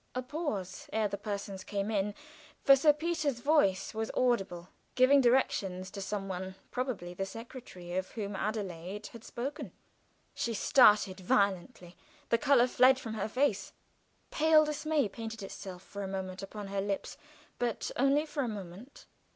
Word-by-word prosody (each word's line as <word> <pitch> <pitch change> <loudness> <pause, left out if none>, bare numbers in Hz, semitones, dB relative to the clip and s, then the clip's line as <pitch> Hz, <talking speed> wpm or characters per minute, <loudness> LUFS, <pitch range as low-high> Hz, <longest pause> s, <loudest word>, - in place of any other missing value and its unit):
A 255 - -1
pause 250 - -4
ere 220 -1 +1
the 200 - -4
persons 200 -2 -5
came 200 +2 -2
in, 205 0 0 0.5
for 275 - +8
Sir 295 +3 +5
Peter's 305 -4 -1
voice 235 -9 +2
was 220 0 -2
audible, 195 -8 0 0.3
giving 265 +2 +6
directions 195 -7 +1
to 200 - -6
some 195 0 -3
one, 190 0 -5 0.2
probably 235 -9 -3
the 195 - -3
secretary 195 -4 -8
of 185 0 -2
whom 205 -2 -4
Adelaide 195 -1 -4
had 230 -1 -11
spoken. 275 +5 -5 0.6
She 230 -1 -2
started 210 -6 +5
violently; 190 0 0 0.3
the 230 - +3
color 260 -1 +5
fled 255 +1 +5
from 230 -4 -6
her 215 0 -2
face; 225 -5 0 0.6
pale 315 0 +5
dismay 300 -2 0
painted 225 +1 -7
itself 190 -1 -8
for 200 - -8
a 195 - -3
moment 190 -1 -5
upon 200 0 -7
her 195 0 -1
lips, 200 0 -3 0.4
but 240 -2 -2
only 275 +4 +3
for 295 -2 -3
a 255 - -1
moment. 205 +4 -8
210 Hz, 155 wpm, -31 LUFS, 195-255 Hz, 0.6 s, for